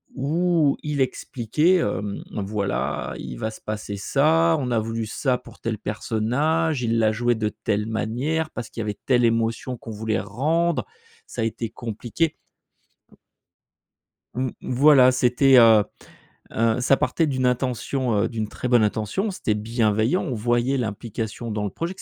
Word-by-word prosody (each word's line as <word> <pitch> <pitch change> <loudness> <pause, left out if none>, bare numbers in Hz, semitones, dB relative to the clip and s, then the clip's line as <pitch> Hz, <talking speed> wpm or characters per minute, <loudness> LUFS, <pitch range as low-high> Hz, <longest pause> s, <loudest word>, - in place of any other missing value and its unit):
où 155 +2 +2
il 150 -2 -2
expliquait, 130 - +1
hem: 105 - -2
«Voilà, 100 0 -2
il 65 -2 -7
va 110 - -2
se - - -13
passer 105 -1 -5
ça, 160 +9 +3
on 125 -2 -2
a 115 - +2
voulu 115 0 -3
ça 125 +4 0
pour - - -16
tel 115 -2 -2
personnage, 125 +9 0
il 115 0 +1
l'a 110 -1 +3
joué 120 +1 +1
de 110 -1 -1
telle 105 -1 -2
manière, 125 +9 -1
parce 120 - -6
qu'il 115 - -6
y - - -2
avait 105 -1 -4
telle 125 -2 +3
émotion 115 +2 0
qu'on 115 - -9
voulait 110 +1 -2
rendre, 155 - 0 0.4
ça 120 - -5
a - - +1
été 115 0 -3
compliqué». 120 +8 -3 2.0
M 130 0 -1
mmh - - -6
voilà, 135 -1 +6
c'était, 130 +1 +4
heu, 115 -3 +7 0.7
heu, 115 +1 +2
ça 135 +2 +4
partait 165 - +1
d'une 130 -3 -1
intention, 125 -1 0
heu - - 0
d'une 110 -3 -3
très 125 - -5
bonne 120 -3 +5
intention, 110 - -1
c'était 110 - -1
bienveillant, 110 - +1
on 145 - -3
voyait 120 +4 +1
l'implication 110 0 -4
dans 105 -1 -2
le - - -2
projet 170 - -4
que - - -12
120 Hz, 165 wpm, -23 LUFS, 110-135 Hz, 2.0 s, heu